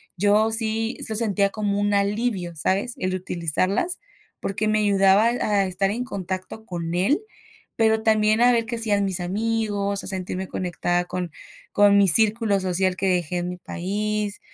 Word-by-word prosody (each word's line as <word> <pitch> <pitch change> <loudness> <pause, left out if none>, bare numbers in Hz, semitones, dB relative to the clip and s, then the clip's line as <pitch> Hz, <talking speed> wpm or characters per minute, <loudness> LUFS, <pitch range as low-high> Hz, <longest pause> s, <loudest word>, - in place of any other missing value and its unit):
yo 210 +3 +2
sí 225 +1 -1
se 220 - -1
sentía 205 -3 +2
como 205 -1 -2
un 205 0 +1
alivio, 200 -3 -1
¿sabes? 195 - -1
El 185 0 -2
utilizarlas, 185 - -1 0.4
porque 205 +2 -2
me 215 0 +2
ayudaba 200 0 +4
a 210 -4 +1
estar 195 +1 -1
en 245 +4 -3
contacto 190 0 -6
con 170 -3 -5
él, 200 - +2 0.6
pero 220 -1 +2
también 215 0 +3
a 245 0 +6
ver 230 -1 +1
que 235 0 -4
hacían 210 -3 +1
mis 190 -2 -1
amigos, 205 +1 -1
a - - -5
sentirme 190 0 -4
conectada 175 -1 -2
con 180 -1 -4 0.4
con 205 0 +5
mi 200 -1 +5
círculo 215 +2 +5
social 185 0 0
que 195 - -1
dejé 175 -1 -1
en 175 0 -3
mi 180 - -6
país. 205 +3 -3
200 Hz, 165 wpm, -23 LUFS, 185-220 Hz, 0.6 s, a